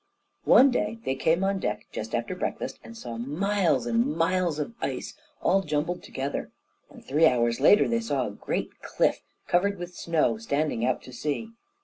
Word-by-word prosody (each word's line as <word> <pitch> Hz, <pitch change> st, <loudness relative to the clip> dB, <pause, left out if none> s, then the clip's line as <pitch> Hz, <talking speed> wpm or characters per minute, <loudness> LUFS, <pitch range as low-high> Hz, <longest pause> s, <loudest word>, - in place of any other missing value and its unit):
One 270 Hz, +1 st, +7 dB
day 225 Hz, -2 st, -1 dB
they 130 Hz, -, +1 dB
came 160 Hz, +7 st, +1 dB
on 195 Hz, 0 st, +1 dB
deck -, -, -3 dB
just -, -, -4 dB
after -, -, -2 dB
breakfast -, -, -4 dB
and 230 Hz, -, -11 dB
saw 120 Hz, -, -6 dB
miles 155 Hz, -, +1 dB
and 120 Hz, +5 st, +1 dB
miles 170 Hz, -1 st, +1 dB
of 155 Hz, +9 st, -3 dB
ice, -, -, -3 dB, 0.3 s
all 195 Hz, -, +4 dB
jumbled 155 Hz, +1 st, -2 dB
together, 135 Hz, +2 st, -4 dB, 0.4 s
and -, -, -15 dB
three 155 Hz, +4 st, +4 dB
hours 120 Hz, -3 st, +2 dB
later 180 Hz, +10 st, +6 dB
they 235 Hz, -, +1 dB
saw 145 Hz, -, -1 dB
a 105 Hz, -, -4 dB
great 100 Hz, -, -4 dB
cliff, -, -, +1 dB, 0.3 s
covered 200 Hz, +3 st, +2 dB
with 175 Hz, 0 st, -7 dB
snow, 170 Hz, +5 st, +1 dB
standing 150 Hz, -, -1 dB
out 125 Hz, +1 st, 0 dB
to 130 Hz, -, -12 dB
sea. 155 Hz, -, -3 dB
160 Hz, 175 wpm, -27 LUFS, 135-195 Hz, 0.4 s, One